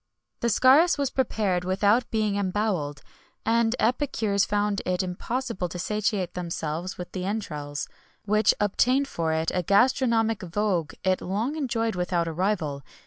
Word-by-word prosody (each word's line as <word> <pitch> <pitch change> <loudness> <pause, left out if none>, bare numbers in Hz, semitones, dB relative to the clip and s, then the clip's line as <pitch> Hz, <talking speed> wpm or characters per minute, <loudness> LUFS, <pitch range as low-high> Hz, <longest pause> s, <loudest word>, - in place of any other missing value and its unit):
The 235 - 0
scarus 275 - +5
was 280 -2 -1
prepared 210 -8 0
without 205 +6 +2
being 215 -2 0
embowelled, 185 -8 -1 0.4
and 230 +1 +2
epicures 220 -5 +1
found 205 -1 0
it 180 0 0
impossible 190 +1 -3
to 180 - -6
satiate 205 0 -1
themselves 170 0 -4
with 180 - -7
the 185 - -4
entrails,[XXI 150 -9 -4
90] - - -30 0.3
which 215 0 +4
obtained 250 +7 +2
for 165 -9 -2
it 160 0 0
a 180 - +1
gastronomic 225 - +2
vogue 180 -4 -1
it 185 -1 +1
long 220 +10 -2
enjoyed 230 -7 -1
without 180 -1 -1
a 165 - -3
rival. 170 -6 -1
200 Hz, 145 wpm, -26 LUFS, 180-225 Hz, 0.4 s, scarus